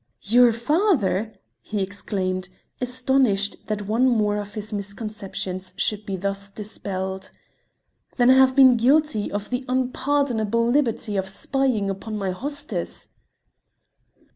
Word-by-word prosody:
"Your 240 Hz, +3 st, +5 dB
father!" 235 Hz, -, +1 dB, 0.3 s
he 215 Hz, -, -4 dB
exclaimed, 185 Hz, -2 st, -3 dB, 0.3 s
astonished 250 Hz, -5 st, +1 dB
that 210 Hz, -1 st, -2 dB
one 235 Hz, +5 st, +3 dB
more 210 Hz, -3 st, +2 dB
of 205 Hz, 0 st, -6 dB
his 215 Hz, 0 st, -5 dB
misconceptions 200 Hz, -3 st, -5 dB
should 210 Hz, -1 st, -1 dB
be 195 Hz, -, -2 dB
thus 200 Hz, +1 st, -3 dB
dispelled. 190 Hz, -2 st, -5 dB, 0.9 s
"Then 245 Hz, 0 st, +6 dB
I -, -, +8 dB
have 260 Hz, 0 st, +5 dB
been 260 Hz, -3 st, +7 dB
guilty 270 Hz, -2 st, +2 dB
of 205 Hz, +2 st, -4 dB
the 250 Hz, +1 st, -1 dB
unpardonable 255 Hz, -3 st, +1 dB
liberty 235 Hz, -5 st, +1 dB
of 190 Hz, 0 st, -1 dB
spying 250 Hz, 0 st, 0 dB
upon 215 Hz, +3 st, -5 dB
my 195 Hz, -2 st, -1 dB
hostess." 285 Hz, +10 st, -5 dB
215 Hz, 120 wpm, -23 LUFS, 200-255 Hz, 0.9 s, I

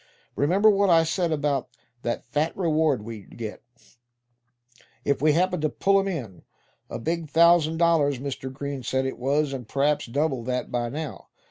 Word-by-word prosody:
Remember 185 Hz, +10 st, +3 dB
what 200 Hz, -1 st, +2 dB
I 165 Hz, -1 st, +6 dB
said 170 Hz, +1 st, -1 dB
about 145 Hz, -4 st, -1 dB, 0.3 s
that 120 Hz, -, -3 dB
fat 150 Hz, +6 st, -1 dB
reward 155 Hz, -, +1 dB
we'd 110 Hz, -2 st, -10 dB
get, 110 Hz, -3 st, -6 dB, 1.4 s
if 140 Hz, -1 st, +1 dB
we 155 Hz, 0 st, +4 dB
happened 180 Hz, +1 st, +1 dB
to 155 Hz, -, +1 dB
pull 195 Hz, +5 st, +2 dB
'em 195 Hz, -, -1 dB
in? 125 Hz, -, -5 dB, 0.5 s
A -, -, -4 dB
big 165 Hz, +3 st, -3 dB
thousand 165 Hz, 0 st, +4 dB
dollars, 160 Hz, -5 st, +3 dB
Mr. 130 Hz, 0 st, -5 dB
Green 140 Hz, 0 st, -5 dB
said 130 Hz, +2 st, -1 dB
it 130 Hz, -, -4 dB
was; 140 Hz, +2 st, 0 dB
and 125 Hz, -4 st, -6 dB
p'raps 145 Hz, +2 st, 0 dB
double 140 Hz, +1 st, -1 dB
that 125 Hz, 0 st, -2 dB
by 120 Hz, -1 st, -1 dB
now. 150 Hz, +3 st, -6 dB
145 Hz, 165 wpm, -25 LUFS, 130-165 Hz, 1.4 s, I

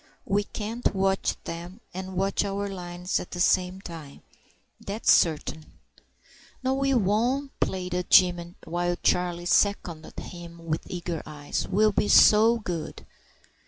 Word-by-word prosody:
We 205 Hz, +1 st, +1 dB
can't 220 Hz, +1 st, -3 dB
watch 195 Hz, 0 st, +1 dB
them 175 Hz, +4 st, -7 dB
and 190 Hz, +1 st, -6 dB
watch 195 Hz, +2 st, +1 dB
our 200 Hz, 0 st, -2 dB
lines 180 Hz, -1 st, -3 dB
at -, -, -8 dB
the 175 Hz, -, -7 dB
same 185 Hz, +1 st, +2 dB
time, 160 Hz, -6 st, -10 dB, 0.6 s
that's 205 Hz, +3 st, +1 dB
certain." 155 Hz, -1 st, 0 dB, 0.9 s
"No, 260 Hz, +1 st, +1 dB
we 275 Hz, 0 st, +1 dB
won't," 240 Hz, +6 st, +1 dB
pleaded 180 Hz, -1 st, -2 dB
Jim, 175 Hz, -1 st, +4 dB
while 175 Hz, +1 st, -1 dB
Charlie 175 Hz, -1 st, +1 dB
seconded 175 Hz, -4 st, 0 dB
him 170 Hz, -1 st, -10 dB
with 160 Hz, -1 st, -3 dB
eager 175 Hz, -2 st, -4 dB
eyes. 150 Hz, -1 st, -4 dB
"We'll 215 Hz, +2 st, +3 dB
be 205 Hz, -, 0 dB
so 220 Hz, +3 st, +6 dB
good." 175 Hz, -8 st, -5 dB
180 Hz, 130 wpm, -26 LUFS, 175-205 Hz, 0.9 s, so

